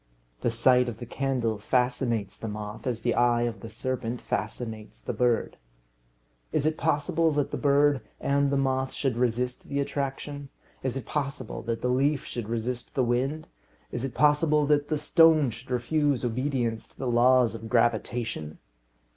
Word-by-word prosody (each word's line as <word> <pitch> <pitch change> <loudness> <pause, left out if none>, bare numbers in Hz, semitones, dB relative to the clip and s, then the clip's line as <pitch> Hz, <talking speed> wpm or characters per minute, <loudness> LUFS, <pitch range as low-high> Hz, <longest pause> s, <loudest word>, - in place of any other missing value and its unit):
The - - 0
sight 125 +2 +4
of 110 - -7
the 120 - -7
candle 120 -4 -1
fascinates 125 -2 0
the 115 - -6
moth 105 +2 -6
as 120 -3 -2
the 120 0 +1
eye 120 -1 +3
of 115 -3 -2
the 115 - -8
serpent 120 +1 -3
fascinates 110 0 -4
the - - -4
bird. 120 -2 +1 0.9
Is 140 - +1
it 155 0 +2
possible 160 +1 +1
that 145 -1 0
the - - -2
bird 145 -1 +3 0.2
and 140 0 +2
the 140 - +1
moth 130 -1 0
should 135 -4 -1
resist 125 +1 -1
the 140 - -2
attraction? 140 0 -3 0.3
Is 130 0 -2
it 130 - -6
possible 140 -5 -3
that 115 -1 -2
the 125 - +1
leaf 140 +3 +1
should 115 -3 -5
resist 120 +2 -3
the 130 - +2
wind? 130 +6 -1 0.4
Is 120 - -3
it 135 - -4
possible 150 0 +4
that 145 0 +2
the 155 - 0
stone 155 -2 +5
should 115 +4 -11
refuse 130 +1 +1
obedience 120 -2 -1
to - - -24
the 135 - -4
laws 125 0 +4
of 115 0 -7
gravitation? 115 -8 0
125 Hz, 170 wpm, -27 LUFS, 115-140 Hz, 0.9 s, stone